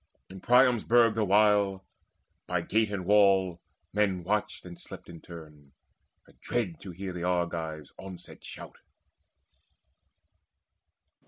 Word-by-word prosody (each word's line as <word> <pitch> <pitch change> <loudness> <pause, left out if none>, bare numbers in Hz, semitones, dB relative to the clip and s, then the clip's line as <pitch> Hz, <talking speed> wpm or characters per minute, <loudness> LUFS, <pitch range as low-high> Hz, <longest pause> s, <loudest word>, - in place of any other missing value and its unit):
In 95 0 -10
Priam's 125 -1 +4
burg 115 -1 +4
the 110 0 0
while 100 -1 +3 0.6
By 90 0 0
gate 110 +5 0
and 95 -3 -4
wall 95 -3 +4 0.3
men 95 -3 +1
watched 105 +2 -2
and 85 -1 -10
slept - - -10
in 85 -1 -11
turn, 75 -5 -13 0.5
Adread 105 -10 -4
to 95 - -10
hear 95 +1 -6
the 90 - -6
Argives' 85 -4 -2
onset 95 -2 -10
shout. - - -10
95 Hz, 115 wpm, -28 LUFS, 85-105 Hz, 0.6 s, Priam's